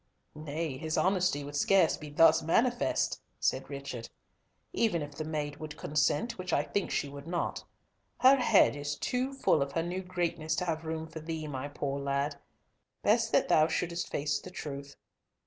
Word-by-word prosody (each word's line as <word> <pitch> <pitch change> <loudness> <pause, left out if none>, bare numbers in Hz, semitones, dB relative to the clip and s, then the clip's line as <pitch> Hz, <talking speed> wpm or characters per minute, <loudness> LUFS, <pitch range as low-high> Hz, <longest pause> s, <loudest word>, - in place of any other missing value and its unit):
"Nay, 155 -2 -4
his 155 0 -2
honesty 185 -5 +2
would 145 +1 -7
scarce 180 +3 +4
be 150 - -9
thus 160 +2 +5
manifest," 240 +10 +1 0.2
said - - 0
Richard, 140 -4 -6 0.6
"even 175 -9 +1
if 145 0 -8
the 155 - -4
maid 150 -2 -3
would 155 0 -7
consent, 150 +10 0
which 185 0 -4
I 145 - +3
think 200 +5 -2
she - - -1
would 140 +2 -9
not. 175 0 -2 0.6
Her 265 +2 +8
head 225 - +5
is 145 0 -3
too 255 - -1
full 270 - +2
of 140 0 -2
her 165 - 0
new 180 +2 -3
greatness 175 -3 -2
to 180 - -1
have 165 -1 -2
room 160 0 -3
for 160 0 -8
thee, 160 0 -4
my 140 -2 -4
poor 140 -1 -3
lad. 140 +1 -1 0.6
Best - - +3
that - - +4
thou 155 0 +5
shouldest 170 +1 -2
face 145 0 -1
the - - -10
truth. 140 -5 -7
155 Hz, 180 wpm, -30 LUFS, 145-175 Hz, 0.6 s, Her